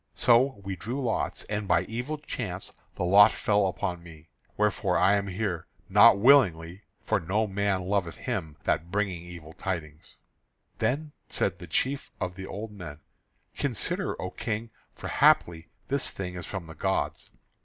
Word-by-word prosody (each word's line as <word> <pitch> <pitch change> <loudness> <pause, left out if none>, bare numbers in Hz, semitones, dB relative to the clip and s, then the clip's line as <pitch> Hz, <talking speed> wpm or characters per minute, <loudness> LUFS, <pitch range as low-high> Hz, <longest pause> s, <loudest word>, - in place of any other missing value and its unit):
So 125 0 +4
we 95 -1 -4
drew 115 +9 -4
lots, 120 -5 -1
and 105 -1 -3
by 90 -2 +3
evil 120 +9 -4
chance 110 -10 -5 0.2
the - - -2
lot 100 +4 +8
fell 105 -2 +1
upon 90 -1 -3
me. 80 -2 -14 0.3
Wherefore 105 -3 +1
I 95 +2 +4
am 100 -1 +1
here, 95 -3 -3 0.2
not - - +7
willingly, 100 -8 +4 0.2
for - - +1
no 100 +6 0
man 100 -2 0
loveth 90 -4 -1
him 80 -2 -4
that 85 +2 0
bringing 95 -3 -1
evil 85 -2 -10
tidings." 80 -5 -6 0.6
Then 150 +3 0 0.2
said 90 -2 -1
the 90 - -9
chief 135 - -1
of 90 - -2
the 95 +1 -8
old 105 +2 -6
men: 85 -7 -9 0.5
"Consider, - - -1
O - - -4
King, 115 +1 -4 0.2
for - - -7
haply 85 +3 +3 0.2
this 140 -1 +1
thing 90 -2 -5
is 90 -2 -7
from 95 -4 -5
the 80 - -10
gods." - - -2
95 Hz, 160 wpm, -28 LUFS, 85-110 Hz, 0.6 s, lot